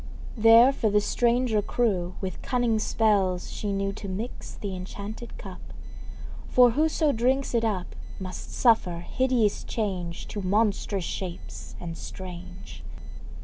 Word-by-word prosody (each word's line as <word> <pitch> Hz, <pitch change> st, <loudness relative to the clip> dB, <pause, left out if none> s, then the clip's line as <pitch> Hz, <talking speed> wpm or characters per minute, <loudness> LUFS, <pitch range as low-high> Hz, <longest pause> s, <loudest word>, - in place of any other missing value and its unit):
There 230 Hz, +3 st, +7 dB
for 225 Hz, -5 st, +1 dB
the 210 Hz, 0 st, +4 dB
stranger 235 Hz, 0 st, +2 dB
crew 195 Hz, -5 st, 0 dB
With 190 Hz, -1 st, -4 dB
cunning 240 Hz, -3 st, +1 dB
spells 200 Hz, -4 st, +1 dB
she 205 Hz, -, -3 dB
knew 195 Hz, 0 st, -1 dB
To 200 Hz, -, -7 dB
mix 210 Hz, +6 st, -5 dB
th' -, -, -7 dB
enchanted 200 Hz, +4 st, -6 dB
cup. -, -, -9 dB, 0.9 s
For 245 Hz, -1 st, +6 dB
whoso 310 Hz, +3 st, +2 dB
drinks 260 Hz, +3 st, +1 dB
it 230 Hz, -1 st, +2 dB
up, 200 Hz, -5 st, -2 dB, 0.2 s
Must 185 Hz, -1 st, -7 dB
suffer 185 Hz, -8 st, +3 dB
hideous 250 Hz, -5 st, +1 dB
change 185 Hz, -6 st, -3 dB
To 205 Hz, -, -4 dB
monstrous 200 Hz, -1 st, +1 dB
shapes 180 Hz, -2 st, -6 dB
and 165 Hz, -1 st, -5 dB
strange. 180 Hz, +1 st, -9 dB
210 Hz, 130 wpm, -26 LUFS, 185-235 Hz, 0.9 s, There